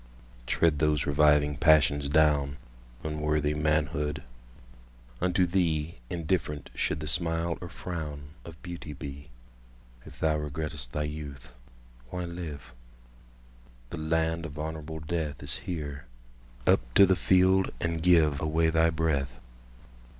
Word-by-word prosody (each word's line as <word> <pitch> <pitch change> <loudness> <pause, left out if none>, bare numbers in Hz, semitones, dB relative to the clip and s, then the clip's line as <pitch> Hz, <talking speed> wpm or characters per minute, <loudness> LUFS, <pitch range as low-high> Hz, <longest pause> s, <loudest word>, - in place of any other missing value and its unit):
Tread 80 -4 +2
those 75 -2 +2
reviving 75 0 +4
passions 75 -1 +4
down, 70 -2 +3 0.5
Unworthy 75 -1 0
manhood!—unto 70 0 -2
theeIndifferent 80 -2 -1
should - - -1
the 75 - -4
smile 85 0 0
or 90 - -5
frownOf 80 -1 -7
beauty 85 -4 -7
be. 70 0 -8 0.7
If - - -13
thou 80 -1 +2
regret'st 75 -3 -4
thy 75 - -1
youth, 70 -5 -7 0.6
why 90 +3 -4
live? 75 -8 -7 1.2
The 85 - -5
land 80 +1 0
of 75 -1 -11
honourable 80 0 -5
deathIs 75 -3 -3
here:—up - - -3 0.2
to 100 - +9
the 95 0 +3
field, 95 +2 +4
and 85 -1 -1
giveAway 80 -1 +3
thy 80 0 +4
breath! 70 -6 -1
75 Hz, 105 wpm, -28 LUFS, 70-80 Hz, 1.2 s, to